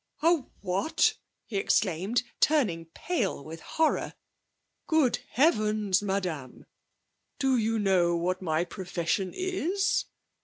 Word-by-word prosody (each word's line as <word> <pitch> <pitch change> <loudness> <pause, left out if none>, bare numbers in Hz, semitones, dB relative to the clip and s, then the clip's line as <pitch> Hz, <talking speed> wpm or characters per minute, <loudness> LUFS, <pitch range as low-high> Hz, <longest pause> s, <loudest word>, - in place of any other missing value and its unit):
'A 335 +1 +5 0.2
what?' 195 - +1 0.3
he 205 - -4
exclaimed, 195 +4 +1 0.2
turning 215 - +2
pale 195 - -2
with 160 +1 -8
horror. 320 -1 0 0.7
'Good 310 -7 +3
heavens, 215 - +2
Madame, 180 -10 -3 0.7
do 270 -2 +2
you 225 -1 +1
know 185 -4 +3
what 185 +2 -1
my 165 -1 0
profession 180 +1 -2
is?' 375 +1 0
200 Hz, 105 wpm, -28 LUFS, 175-270 Hz, 0.7 s, A